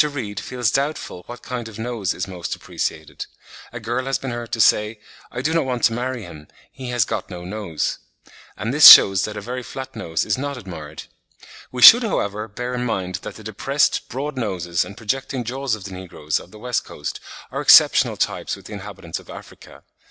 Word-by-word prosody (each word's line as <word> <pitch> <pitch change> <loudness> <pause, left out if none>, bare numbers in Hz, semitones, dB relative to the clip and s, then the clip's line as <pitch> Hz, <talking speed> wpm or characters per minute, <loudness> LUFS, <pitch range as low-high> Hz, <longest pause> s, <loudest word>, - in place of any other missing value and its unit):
Reade 125 -10 -4
feels 125 -4 -2
doubtful 140 -9 -2
what 120 - -10
kind 120 -2 -5
of 110 -2 -11
nose 110 -5 -3
is 90 - -4
most 90 -3 -5
appreciated; 80 -1 -5 0.4
a 120 - -7
girl 120 +3 -3
has 135 -2 0
been 135 - -6
heard 120 -1 -6
to 115 - -2
say, 105 0 +3 0.3
"I 125 - -5
do 160 +3 0
not 165 -3 +1
want 125 -2 -3
to 115 - +4
marry 125 0 -3
him, 75 -5 -12 0.2
he 130 -2 -8
has 120 -1 +1
got - - -4
no 90 -2 -8
nose"; 95 -6 -3 0.6
and 110 +5 -3
this 150 +1 +9
shews 95 -1 +9
that 105 -1 -7
a - - -5
very 125 +4 -5
flat 130 +1 -8
nose 80 -8 -2
is 105 +4 -1
not 140 0 -4
admired. 80 -8 -9 0.7
We 125 -1 -1
should, 240 - +11
however, 105 - -2
bear 125 +4 -5
in 125 0 -2
mind 95 -6 -2
that - - -8
the 110 - -12
depressed, 130 +7 0
broad 135 +3 -5
noses 90 -7 -1
and 100 - -11
projecting 130 +2 -3
jaws 130 +1 -2
of 105 - -11
the 100 - -8
negroes 85 -5 -4
of - - -14
the 110 - -14
West 125 +2 -2
Coast 75 - -7 0.3
are - - -3
exceptional - - +6
types - - -2
with - - -16
the - - -9
inhabitants - - -7
of - - -18
Africa. - - -13
115 Hz, 205 wpm, -21 LUFS, 95-130 Hz, 0.7 s, should